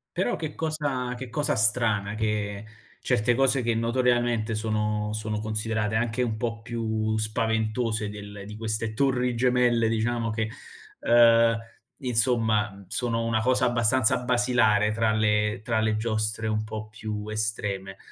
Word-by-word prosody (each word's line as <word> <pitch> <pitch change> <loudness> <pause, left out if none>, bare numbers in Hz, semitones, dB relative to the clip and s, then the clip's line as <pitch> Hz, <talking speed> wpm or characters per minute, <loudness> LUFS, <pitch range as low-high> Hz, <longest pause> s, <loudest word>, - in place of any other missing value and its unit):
Però 185 - 0
che 155 -2 -5
cosa 145 -6 -2
che 125 -1 -7
cosa 145 +2 0
strana 105 -2 +1
che 105 -1 -2 0.4
certe 120 -1 +2
cose 135 0 +2
che 115 -1 0
notoriamente 120 -1 +1
sono 105 -1 -1
sono 110 0 -3
considerate 110 0 -2
anche 115 +2 0
un 110 -2 -2
po' 115 -1 -3
più 110 -2 -2
spaventose 110 0 -1
del 105 -1 -9
di 105 +1 -9
queste 110 0 -2
"Torri 125 -1 +1
Gemelle", 120 -2 +3
diciamo, 115 +1 0
che, 110 0 -2 0.5
uhm, 115 -1 +5 0.4
insomma, 115 -3 +1
m 100 0 -14
sono 115 +2 -1
una 110 -1 +1
cosa 125 +1 +2
abbastanza 120 +1 +2
basilare 120 -4 +2
tra 115 0 +1
le 105 -1 +1
tra 115 -1 0
le 110 -1 +1
giostre 110 0 -1
un 110 0 0
po' 110 0 -6
più 110 -1 -6
estreme. 105 -3 -3
110 Hz, 140 wpm, -26 LUFS, 110-120 Hz, 0.5 s, uhm